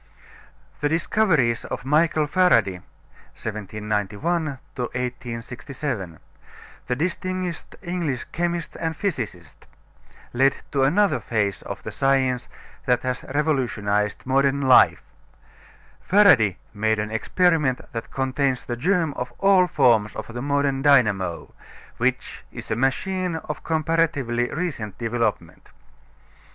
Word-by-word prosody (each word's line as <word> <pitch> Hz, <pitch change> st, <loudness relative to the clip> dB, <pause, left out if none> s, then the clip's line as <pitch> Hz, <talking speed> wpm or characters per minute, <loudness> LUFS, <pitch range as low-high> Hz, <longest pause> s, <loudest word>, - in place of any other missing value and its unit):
The 145 Hz, -, +1 dB
discoveries 160 Hz, -, +2 dB
of -, -, -5 dB
Michael 155 Hz, +2 st, +3 dB
Faraday 115 Hz, -, +3 dB, 0.6 s
(1791 110 Hz, -, -2 dB, 0.2 s
1867), 125 Hz, -, -5 dB, 0.7 s
the 125 Hz, -, 0 dB
distinguished 180 Hz, +2 st, -3 dB
English 175 Hz, -8 st, -2 dB
chemist 170 Hz, -1 st, -2 dB
and 160 Hz, -1 st, -2 dB
physicist, 115 Hz, -, -4 dB, 0.7 s
led 135 Hz, +3 st, +3 dB, 0.2 s
to 140 Hz, -, +1 dB
another 190 Hz, +10 st, +3 dB
phase 105 Hz, -4 st, -1 dB
of -, -, -7 dB
the -, -, -5 dB
science 130 Hz, -2 st, +1 dB, 0.4 s
that 125 Hz, -1 st, +2 dB
has 130 Hz, -1 st, -2 dB
revolutionized 120 Hz, -8 st, 0 dB
modern 135 Hz, +1 st, +2 dB
life. 130 Hz, -2 st, +5 dB, 1.0 s
Faraday 140 Hz, -, +5 dB, 0.2 s
made 110 Hz, +1 st, +1 dB
an 105 Hz, 0 st, -3 dB
experiment 150 Hz, +2 st, +2 dB
that 115 Hz, -1 st, -5 dB
contains 130 Hz, -1 st, -1 dB
the 120 Hz, -, -3 dB
germ 165 Hz, +3 st, +1 dB
of 125 Hz, -2 st, -5 dB
all 195 Hz, -2 st, +4 dB
forms 115 Hz, -9 st, +3 dB
of 115 Hz, -, -7 dB
the 120 Hz, -, -4 dB
modern 140 Hz, -1 st, 0 dB
dynamo, 110 Hz, -, +2 dB, 0.4 s
which -, -, -1 dB
is -, -, -8 dB
a -, -, +2 dB
machine 175 Hz, -, 0 dB
of 150 Hz, -1 st, -6 dB
comparatively 155 Hz, -7 st, 0 dB
recent 145 Hz, -, -4 dB
development. 115 Hz, -7 st, -2 dB
135 Hz, 110 wpm, -23 LUFS, 115-160 Hz, 1.0 s, life